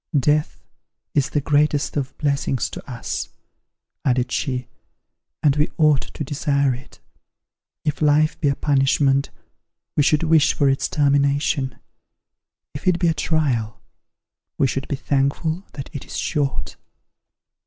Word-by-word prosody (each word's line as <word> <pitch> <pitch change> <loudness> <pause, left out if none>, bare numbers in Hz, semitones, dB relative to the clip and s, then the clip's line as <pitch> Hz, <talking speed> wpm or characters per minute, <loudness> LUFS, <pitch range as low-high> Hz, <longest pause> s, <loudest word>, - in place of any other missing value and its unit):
Death 150 +3 0 0.5
is 140 -3 +2
the 145 - 0
greatest 145 +1 +1
of 140 -2 -3
blessings 140 -4 0
to - - -7
us," 115 - -4 0.7
added 125 -1 +1
she, 125 -2 -2 0.8
"and 145 -2 +4
we 150 - +2
ought 150 -4 +4
to - - -3
desire 140 -1 +1
it. 125 +1 -11 0.9
If 150 - -1
life 150 +1 +3
be 150 - +2
a 140 - +2
punishment, 135 -1 +2 0.7
we - - +4
should 150 +2 +3
wish 160 -2 +4
for 140 - +2
its 135 0 +1
termination; 140 -2 +1 1.0
if 140 +6 -7
it 180 -2 +4
be 175 -1 +2
a - - +2
trial, 140 -8 0 0.8
we - - +3
should 135 +1 -2
be 145 - -1
thankful 145 +7 -1
that 140 - -7
it 140 - -6
is - - -6
short." 145 -4 -2
140 Hz, 135 wpm, -22 LUFS, 135-150 Hz, 1.0 s, and